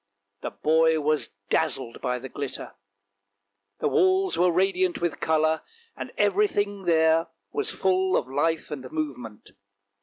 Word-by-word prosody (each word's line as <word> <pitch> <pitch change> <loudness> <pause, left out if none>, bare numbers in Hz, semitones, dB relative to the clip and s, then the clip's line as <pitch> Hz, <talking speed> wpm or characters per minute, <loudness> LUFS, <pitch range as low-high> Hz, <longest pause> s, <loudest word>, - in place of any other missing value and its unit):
The - - -3
boy 160 +1 +2
was 155 0 0 0.2
dazzled 130 -6 -1
by 125 -1 -1
the 130 +2 -7
glitter; 140 0 -6 1.1
the - - +2
walls 380 -2 +3
were 180 +1 +3
radiant 185 0 +1
with 170 -2 -2
colour, 160 0 +2 0.3
and - - -7
everything 205 - +1
there 160 -1 +3 0.2
was 430 0 -1
full 190 - +1
of - - -2
life 155 +4 -1
and 130 -3 -6
movement. 125 -9 -5
160 Hz, 130 wpm, -26 LUFS, 145-190 Hz, 1.1 s, walls